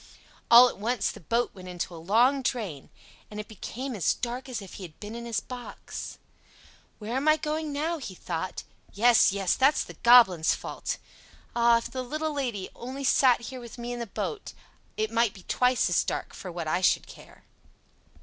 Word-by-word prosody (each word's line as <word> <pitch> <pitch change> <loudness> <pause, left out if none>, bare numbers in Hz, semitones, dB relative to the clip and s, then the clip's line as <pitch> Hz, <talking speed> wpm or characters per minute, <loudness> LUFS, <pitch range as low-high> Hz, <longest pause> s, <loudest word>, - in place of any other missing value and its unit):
All 240 +2 +10
at 240 - -6
once 225 0 0
the - - -11
boat 230 +8 0
went 185 -2 -11
into 180 0 -4
a - - -8
long 240 +10 +3
drain, 205 - -3 0.4
and 210 - -7
it 210 - -6
became 250 +4 -6
as 185 -7 +1
dark 250 +2 -5
as 245 - -3
if 195 -3 -11
he 195 - -8
had 165 -4 -11
been 210 +1 -7
in 235 0 -6
his 230 - 0
box. 250 -1 -8 0.8
"Where 220 +3 -5
am 275 +3 -1
I 310 0 +6
going 305 0 -3
now?" 315 +4 -2
he 205 -9 -7
thought. 175 +1 -4 0.3
"Yes, 235 +1 +5
yes, 195 -2 +1
that's 275 +3 +3
the - - -10
Goblin's 230 -9 +6
fault. - - -5 0.6
Ah! 235 0 +5
if 230 - -5
the 260 - -3
little 310 +5 -3
Lady 240 -9 -3
only 260 +3 -6
sat 255 -2 +4
here 255 +2 -7
with 235 0 -10
me 240 0 -5
in 240 - -5
the 235 - -4
boat, 220 - -5 0.4
it 215 0 -1
might 230 -2 +2
be 190 - -13
twice 250 0 +2
as - - +2
dark - - -4
for 185 - -8
what 170 -2 -5
I 175 +4 0
should 190 - +3
care." - - -15
235 Hz, 200 wpm, -27 LUFS, 200-255 Hz, 0.8 s, All